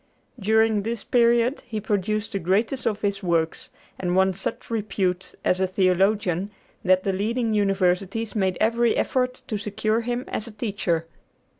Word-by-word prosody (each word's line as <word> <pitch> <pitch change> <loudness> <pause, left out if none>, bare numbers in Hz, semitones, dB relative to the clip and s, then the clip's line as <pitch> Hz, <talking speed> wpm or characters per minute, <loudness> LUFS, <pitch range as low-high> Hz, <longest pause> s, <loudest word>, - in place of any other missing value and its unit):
During 220 0 +3
this 225 +2 -3
period 235 +2 +3
he 220 -3 -3
produced 210 +1 -1
the 195 - -2
greatest 215 +9 0
of 215 -1 -1
his 200 -1 -1
works, 165 -3 0 0.3
and 180 -1 -1
won 190 0 +4
such 195 +5 -5
repute 195 -4 -1
as 180 - +2
a 190 - +2
theologian 190 0 +1 0.3
that 185 0 +3
the 195 - 0
leading 225 +4 0
universities 195 +2 +1
made 190 -3 +1
every 235 +1 +2
effort 255 -1 0
to 215 - -3
secure 215 +2 0
him 245 +2 -3
as 215 - -3
a - - -8
teacher. 200 -7 -1
205 Hz, 155 wpm, -24 LUFS, 190-225 Hz, 0.3 s, won